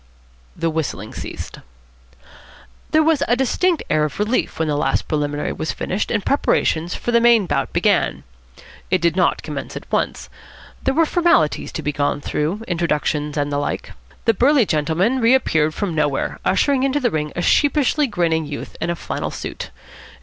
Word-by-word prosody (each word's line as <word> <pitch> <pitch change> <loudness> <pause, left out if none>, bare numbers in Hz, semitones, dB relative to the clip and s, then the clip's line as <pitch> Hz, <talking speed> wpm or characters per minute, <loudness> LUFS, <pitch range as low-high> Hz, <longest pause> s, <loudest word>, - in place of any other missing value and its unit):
The 165 - -1
whistling 145 -10 -3
ceased. - - -7 1.3
There 315 0 +4
was 315 -2 +2
a 240 - +3
distinct 315 +6 +1
air 155 0 +2
of 150 - -3
relief 215 +4 0
when 160 - 0
the 150 - 0
last 145 - 0
preliminary 145 -1 -1
was 155 - -3
finished 190 +3 -2
and 215 -3 -1
preparations 175 - +1
for 240 - -3
the 235 0 +4
main 235 -3 +5
bout - - -1
began. - - +1 0.7
It 185 - +2
did 170 -1 +1
not 185 - +1
commence - - -6
at - - -7
once. - - -1 0.5
There 270 0 0
were 330 +1 +4
formalities 335 - +2
to 160 - -4
be 150 - 0
gone 145 0 0
through, 160 +9 -2
introductions 150 -3 -1
and 145 0 0
the 145 - 0
like. 145 - -3 0.3
The 225 - +4
burly 255 +3 +4
gentleman 170 - +1
reappeared 230 -11 +3
from 200 -5 -2
nowhere, 145 -3 -1
ushering 265 +8 +2
into 275 +2 +1
the 245 -4 +1
ring 150 -1 -2
a 175 - -2
sheepishly 290 - +3
grinning 165 - 0
youth 145 - -7
in 160 - -1
a 170 - 0
flannel - - -4
suit. - - -6
175 Hz, 170 wpm, -20 LUFS, 150-250 Hz, 1.3 s, main